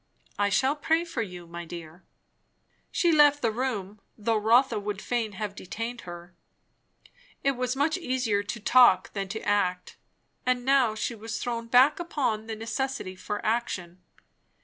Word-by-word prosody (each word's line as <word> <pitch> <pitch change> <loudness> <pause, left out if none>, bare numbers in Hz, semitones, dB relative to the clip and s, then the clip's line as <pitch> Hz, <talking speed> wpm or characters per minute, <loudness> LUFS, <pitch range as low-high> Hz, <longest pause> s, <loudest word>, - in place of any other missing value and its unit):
I 205 0 +3
shall 265 +8 +2
pray 320 +3 +1
for 275 -8 -3
you, 180 -5 -6
my 170 +1 -7
dear." 170 0 -9 0.9
She 345 - +2
left 290 -2 +5
the 230 - +2
room, 215 -5 -3 0.2
though 225 +1 0
Rotha 225 +3 +3
would 205 -1 -4
fain 225 -2 -2
have 210 0 -4
detained 230 +6 -6
her. 175 0 -10 1.1
It 275 - +3
was 255 0 -2
much 310 +6 +1
easier 250 - 0
to 205 +3 -5
talk 235 -4 +5
than 195 -1 -3
to 220 +3 -5
act; 185 -3 0 0.5
and 250 -1 0
now 265 -5 +3
she 220 - -2
was 225 0 -5
thrown 230 -1 -3
back 255 +7 +5
upon 255 -10 -2
the 225 - -4
necessity 230 -2 -3
for 205 +2 -5
action. 185 -6 -2
225 Hz, 155 wpm, -27 LUFS, 200-255 Hz, 1.1 s, left